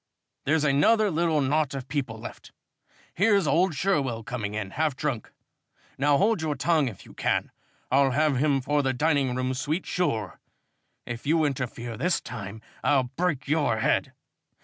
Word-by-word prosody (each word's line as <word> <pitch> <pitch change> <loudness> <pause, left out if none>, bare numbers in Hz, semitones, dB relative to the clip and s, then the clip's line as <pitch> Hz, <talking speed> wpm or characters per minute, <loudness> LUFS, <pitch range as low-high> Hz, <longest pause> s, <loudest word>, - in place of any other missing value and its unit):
"There's 155 +2 +2
another 195 +10 +4
little 160 -2 +1
knot 145 +1 +1
of 135 -1 -6
people 130 -6 -3
left. 110 - -10 0.6
Here's 200 -1 +3
old 170 +1 +2
Sherwell 135 -9 0
coming 110 -5 -4
in, 100 -3 -4
half 155 +1 0
drunk. 130 -6 -3 0.6
Now 140 +1 +3
hold 205 0 +2
your 155 -2 -1
tongue 155 +1 +2
if 110 -6 -8
you - - -14
can. - - -1 0.4
I'll 135 +1 +4
have 145 +1 +2
him 140 0 +2
for 145 +3 +1
the 135 -1 0
dining 140 -2 +1
room 130 0 -1
suite, 150 +7 -2
sure. 110 - -2 0.7
If 120 +3 -6
you 160 0 +3
interfere 120 -4 -3
this 175 +8 +1
time, 110 -2 -8 0.2
I'll 130 -4 +2
break 155 -6 -1
your 145 -6 +1
head. - - +1
140 Hz, 160 wpm, -26 LUFS, 125-155 Hz, 0.7 s, another